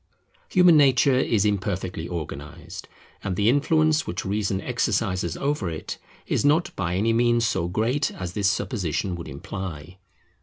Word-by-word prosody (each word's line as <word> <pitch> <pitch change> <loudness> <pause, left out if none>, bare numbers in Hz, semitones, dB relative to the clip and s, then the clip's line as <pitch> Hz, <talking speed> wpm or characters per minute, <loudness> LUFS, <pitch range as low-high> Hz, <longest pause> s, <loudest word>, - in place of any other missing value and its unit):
Human 180 -3 +6
nature 135 -2 +4
is 110 -5 +1
imperfectly 95 -4 -2
organized; 80 +2 -7 0.4
and 95 -2 -2
the 105 +3 +1
influence 155 +3 +2
which 85 - -4
Reason 100 -1 -1
exercises 100 -8 -1
over 140 -10 -1
it 80 -1 -6 0.3
is - - 0
not 150 +4 +2
by 90 -2 -2
any 110 +4 +2
means 120 0 +3
so 85 - -1
great 115 - 0
as 90 -1 -6
this 100 0 +2
supposition 95 - -2
would 85 - -7
imply. 90 +3 -7
100 Hz, 145 wpm, -24 LUFS, 90-125 Hz, 0.4 s, Human